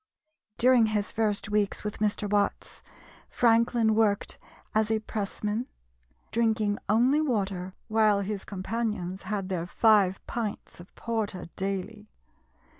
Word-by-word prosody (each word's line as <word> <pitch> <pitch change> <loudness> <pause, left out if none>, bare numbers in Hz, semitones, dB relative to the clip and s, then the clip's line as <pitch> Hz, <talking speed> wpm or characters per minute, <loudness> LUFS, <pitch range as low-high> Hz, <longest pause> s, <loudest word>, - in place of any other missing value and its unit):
During 245 -2 +5
his 210 -1 -1
first 210 -2 -1
weeks 210 -1 0
with 210 -1 -5
Mr. 210 0 0
Watts, 205 0 -1 0.5
Franklin 230 -1 +3
worked 215 -2 +1 0.3
as 215 0 +2
a 220 - +2
pressman, 215 +2 -3 0.6
drinking 220 -3 +1
only 250 +8 +4
water 195 -9 -2
while 215 -2 +3
his 200 0 -4
companions 195 -2 -3
had 195 -1 -3
their 175 -2 -2
five 200 -2 +4
pints 220 -6 -5
of 175 - -13
porter 220 -6 -3
daily. 200 +3 -4
210 Hz, 115 wpm, -28 LUFS, 200-225 Hz, 0.6 s, During